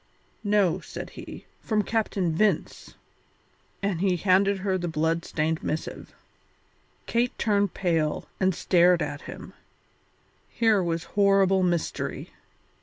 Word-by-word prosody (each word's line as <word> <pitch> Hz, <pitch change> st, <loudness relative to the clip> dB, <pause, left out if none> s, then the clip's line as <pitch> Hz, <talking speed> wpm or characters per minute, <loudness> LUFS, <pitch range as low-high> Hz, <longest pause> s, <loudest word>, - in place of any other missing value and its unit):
"No," 205 Hz, -4 st, +2 dB
said -, -, -8 dB
he, -, -, -10 dB
"from 215 Hz, -2 st, 0 dB
Captain 200 Hz, -6 st, -1 dB
Vince." 210 Hz, +4 st, 0 dB, 0.9 s
And 195 Hz, -4 st, -1 dB
he 190 Hz, -2 st, +2 dB
handed 195 Hz, +3 st, +3 dB
her 190 Hz, -2 st, +1 dB
the 175 Hz, -1 st, -2 dB
blood 165 Hz, +1 st, 0 dB
stained 160 Hz, +1 st, -1 dB
missive. 155 Hz, -, -5 dB, 0.9 s
Kate 240 Hz, +1 st, 0 dB
turned 205 Hz, -3 st, +1 dB
pale 165 Hz, -5 st, 0 dB
and 190 Hz, -2 st, +2 dB
stared 175 Hz, -1 st, +4 dB
at 145 Hz, 0 st, -5 dB
him; -, -, -9 dB, 1.0 s
here 225 Hz, -4 st, +2 dB
was 165 Hz, -2 st, -2 dB
horrible 195 Hz, -1 st, +3 dB
mystery. 175 Hz, -3 st, -2 dB
185 Hz, 115 wpm, -26 LUFS, 165-200 Hz, 1.0 s, stared